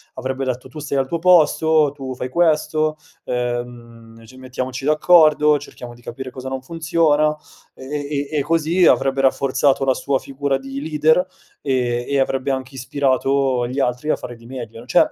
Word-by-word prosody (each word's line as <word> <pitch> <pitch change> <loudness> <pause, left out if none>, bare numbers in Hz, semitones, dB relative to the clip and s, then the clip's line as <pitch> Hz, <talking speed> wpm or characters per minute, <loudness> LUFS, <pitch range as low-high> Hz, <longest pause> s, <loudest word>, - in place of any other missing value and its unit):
avrebbe 130 +1 -3
detto: 130 0 -4
"Tu 155 - -9
stai 145 -2 -3
al 135 0 +1
tuo 170 +2 -2
posto, 160 -3 +4
tu 135 -2 -6
fai 125 0 -5
questo, 155 0 +1 0.3
ehm, 120 -2 -5
ci 130 +3 -16
mettiamoci 130 0 -5
d'accordo, 155 -1 +5
cerchiamo 125 -3 -10
di 120 - -18
capire 130 +2 -7
cosa 130 0 -7
non 130 -1 -4
funziona," 160 -1 +1 0.4
e 130 - -11 0.2
e 145 -1 -2
e 155 - -1
e - - +1
così 165 +4 +2
avrebbe 135 0 +2
rafforzato 135 +1 +2
la 130 - +3
sua 140 +1 -1
figura 135 0 -2
di 135 +1 -7
leader, 160 +3 +2 0.4
e 125 -3 -1
e 140 -1 +1
avrebbe 135 +1 0
anche 130 0 -4
ispirato 135 -1 0
gli 130 +3 -4
altri 125 +3 -1
a - - +3
fare 120 -1 -8
di 115 0 -18
meglio, 120 -3 -8
n 125 - -15
cioè, - - +4
135 Hz, 180 wpm, -20 LUFS, 125-150 Hz, 0.4 s, d'accordo